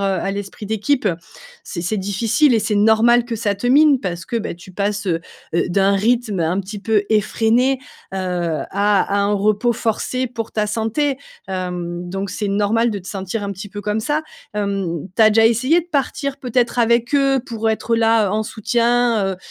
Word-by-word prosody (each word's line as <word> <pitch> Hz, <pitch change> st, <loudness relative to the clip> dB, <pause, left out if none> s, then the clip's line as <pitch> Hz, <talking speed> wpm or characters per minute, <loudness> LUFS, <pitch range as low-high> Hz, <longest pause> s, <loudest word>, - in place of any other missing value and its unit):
à 195 Hz, 0 st, 0 dB
l'esprit 200 Hz, +1 st, -6 dB
d'équipe, 220 Hz, +4 st, 0 dB, 0.6 s
c'est 170 Hz, -, -6 dB
c'est 210 Hz, +4 st, -1 dB
difficile 225 Hz, +8 st, +2 dB
et -, -, +4 dB
c'est 215 Hz, 0 st, -1 dB
normal 225 Hz, +3 st, +4 dB
que 230 Hz, -2 st, -3 dB
ça 205 Hz, -2 st, 0 dB
te 200 Hz, +5 st, -4 dB
mine, 285 Hz, +1 st, +5 dB
parce 175 Hz, -5 st, -4 dB
que, 235 Hz, -, -3 dB
beh, 205 Hz, -, -4 dB
tu 180 Hz, +2 st, -14 dB
passes, 205 Hz, +1 st, -2 dB
heu 165 Hz, -2 st, 0 dB, 0.3 s
heu, 170 Hz, -, +1 dB
d'un 195 Hz, +2 st, +3 dB
rythme 215 Hz, -2 st, +1 dB
un 170 Hz, +4 st, 0 dB
petit 205 Hz, +2 st, -7 dB
peu 210 Hz, 0 st, +1 dB
effréné, 230 Hz, +5 st, +2 dB, 0.3 s
heu, -, -, -2 dB
à 175 Hz, -4 st, -2 dB
à 200 Hz, 0 st, +2 dB
un 200 Hz, +1 st, +1 dB
repos 215 Hz, +4 st, +1 dB
forcé 255 Hz, +3 st, -1 dB
pour 230 Hz, -2 st, -6 dB
ta 210 Hz, -1 st, 0 dB
santé, 235 Hz, +6 st, -1 dB, 0.3 s
hem, 180 Hz, -1 st, -4 dB
donc 195 Hz, 0 st, -4 dB
c'est 205 Hz, +2 st, -3 dB
normal 210 Hz, +4 st, +1 dB
de 205 Hz, -, -3 dB
te 185 Hz, -, -14 dB
sentir 195 Hz, +2 st, -4 dB
un 200 Hz, -, -3 dB
petit 200 Hz, +2 st, -8 dB
peu 205 Hz, +1 st, -7 dB
comme 210 Hz, +1 st, -1 dB
ça. 295 Hz, +7 st, 0 dB, 0.3 s
Hem, 195 Hz, -5 st, -2 dB
tu -, -, 0 dB
as 215 Hz, -, +7 dB
déjà 225 Hz, +1 st, +5 dB
essayé 260 Hz, +9 st, +2 dB
de 345 Hz, -, -13 dB
partir 280 Hz, -2 st, -2 dB
peut-être 245 Hz, -2 st, 0 dB
avec 235 Hz, +2 st, +2 dB
eux, 275 Hz, -2 st, +3 dB
pour 225 Hz, -2 st, -2 dB
être 230 Hz, +1 st, 0 dB
là, 225 Hz, -2 st, +3 dB
heu, -, -, -1 dB
en 215 Hz, +1 st, 0 dB
soutien, 235 Hz, -2 st, +1 dB
heu, -, -, -7 dB
215 Hz, 195 wpm, -19 LUFS, 195-235 Hz, 0.6 s, as